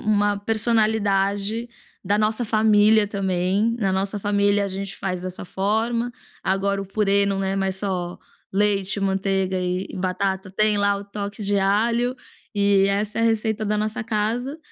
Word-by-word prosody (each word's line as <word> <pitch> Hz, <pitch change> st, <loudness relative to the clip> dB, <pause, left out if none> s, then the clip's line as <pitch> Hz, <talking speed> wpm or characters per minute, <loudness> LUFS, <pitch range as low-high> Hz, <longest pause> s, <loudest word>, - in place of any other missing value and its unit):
uma 205 Hz, 0 st, +1 dB
personalidade 215 Hz, 0 st, +1 dB, 0.4 s
da 200 Hz, +2 st, +2 dB
nossa 215 Hz, +3 st, 0 dB
família 215 Hz, -1 st, +4 dB
também, 195 Hz, +2 st, 0 dB
na 195 Hz, -3 st, 0 dB
nossa 195 Hz, +2 st, -1 dB
família 205 Hz, 0 st, +2 dB
a -, -, -2 dB
gente 195 Hz, 0 st, -5 dB
faz 185 Hz, -2 st, -3 dB
dessa 185 Hz, 0 st, -6 dB
forma, 225 Hz, +6 st, -1 dB, 0.3 s
agora 195 Hz, +1 st, 0 dB
o 195 Hz, -, -6 dB
purê 200 Hz, 0 st, +2 dB
não 195 Hz, -1 st, -1 dB
é 195 Hz, 0 st, -1 dB
mais 190 Hz, -1 st, 0 dB
só 185 Hz, -3 st, -3 dB, 0.3 s
leite, 200 Hz, 0 st, +2 dB
manteiga 190 Hz, -1 st, 0 dB
e 180 Hz, +1 st, -2 dB
e -, -, -8 dB
batata, 190 Hz, +1 st, -2 dB
tem 210 Hz, +1 st, +4 dB
lá 200 Hz, 0 st, +2 dB
o 200 Hz, -, -7 dB
toque 205 Hz, +1 st, -6 dB
de 200 Hz, 0 st, +1 dB
alho, 230 Hz, +5 st, +1 dB, 0.4 s
e 200 Hz, -1 st, +3 dB
essa 205 Hz, +2 st, -1 dB
é -, -, +1 dB
a -, -, +3 dB
receita 220 Hz, -1 st, 0 dB
da 210 Hz, 0 st, 0 dB
nossa 215 Hz, +3 st, -2 dB
casa 230 Hz, +6 st, -2 dB
200 Hz, 165 wpm, -23 LUFS, 195-215 Hz, 0.4 s, família